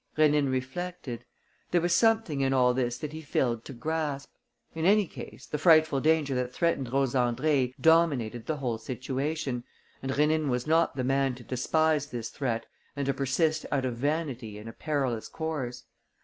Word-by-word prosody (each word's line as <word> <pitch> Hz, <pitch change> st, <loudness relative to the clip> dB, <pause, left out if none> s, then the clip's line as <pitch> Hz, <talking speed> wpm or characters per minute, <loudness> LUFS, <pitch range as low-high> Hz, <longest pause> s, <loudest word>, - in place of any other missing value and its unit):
Rénine 150 Hz, -3 st, +4 dB
reflected. 130 Hz, 0 st, -4 dB, 0.4 s
There 175 Hz, -, +3 dB
was 175 Hz, +1 st, +1 dB
something 220 Hz, -7 st, +3 dB
in 135 Hz, 0 st, +2 dB
all 125 Hz, -1 st, +4 dB
this 120 Hz, -1 st, -1 dB
that 150 Hz, +3 st, -6 dB
he 160 Hz, -, -6 dB
failed 120 Hz, -6 st, 0 dB
to 140 Hz, -, -8 dB
grasp. 150 Hz, +1 st, -3 dB, 0.4 s
In 160 Hz, -, -4 dB
any 205 Hz, +3 st, +5 dB
case, -, -, -10 dB
the 150 Hz, -, -4 dB
frightful 155 Hz, -3 st, +5 dB
danger 155 Hz, -2 st, +2 dB
that 125 Hz, -1 st, -1 dB
threatened 140 Hz, -5 st, 0 dB
Rose 135 Hz, -1 st, +1 dB
Andrée 130 Hz, +1 st, +1 dB
dominated 140 Hz, -9 st, +3 dB
the 155 Hz, -, -1 dB
whole 120 Hz, -5 st, -2 dB
situation; 130 Hz, +2 st, -3 dB, 0.4 s
and 135 Hz, -, -3 dB
Rénine 150 Hz, +1 st, +2 dB
was 125 Hz, -1 st, -1 dB
not 165 Hz, +2 st, +2 dB
the 130 Hz, -, -1 dB
man 135 Hz, 0 st, +1 dB
to 125 Hz, -, -12 dB
despise 150 Hz, +4 st, +1 dB
this 115 Hz, -4 st, -5 dB
threat 115 Hz, -5 st, -2 dB, 0.3 s
and 140 Hz, -1 st, -2 dB
to 140 Hz, -, +1 dB
persist 155 Hz, +4 st, 0 dB
out 135 Hz, -2 st, +1 dB
of 125 Hz, -2 st, -2 dB
vanity 135 Hz, -5 st, -2 dB
in 105 Hz, +2 st, -9 dB
a 115 Hz, -, -7 dB
perilous 135 Hz, -7 st, -2 dB
course. 135 Hz, -6 st, -4 dB
140 Hz, 175 wpm, -28 LUFS, 125-155 Hz, 0.4 s, any